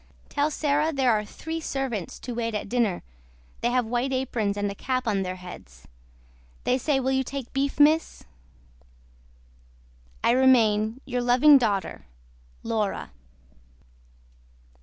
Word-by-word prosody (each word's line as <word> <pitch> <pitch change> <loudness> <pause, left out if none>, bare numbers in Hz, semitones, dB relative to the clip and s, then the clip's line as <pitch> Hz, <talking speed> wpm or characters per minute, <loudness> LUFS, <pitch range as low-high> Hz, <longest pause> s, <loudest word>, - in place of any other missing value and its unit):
TELL 290 +1 0
SARAH 300 +1 0
THERE 265 -3 +2
ARE 210 -1 0
THREE 320 +9 -6
SERVANTS 265 - -4
TO 245 - -7
WAIT 230 -1 -2
AT 210 - -3
DINNER 225 -5 0 0.6
THEY 240 - +1
HAVE 250 -1 +1
WHITE 245 +4 -1
APRONS 235 -6 -1
AND 205 0 -1
A - - -5
CAP 255 +4 -2
ON 200 -3 +1
THEIR 185 -1 -3
HEADS. 175 - -12 0.8
THEY 255 - +1
SAY 275 +1 +1
WILL 265 0 0
YOU 265 0 +1
TAKE 265 -1 -7
BEEF 275 +1 -1
MISS 310 +2 +3 2.0
I - - +4
REMAIN 235 -2 +3
YOUR 250 -2 -2
LOVING 255 +4 +6
DAUGHTER 200 - -2 0.6
LAURA. 215 - -2
245 Hz, 135 wpm, -25 LUFS, 215-270 Hz, 2.0 s, LOVING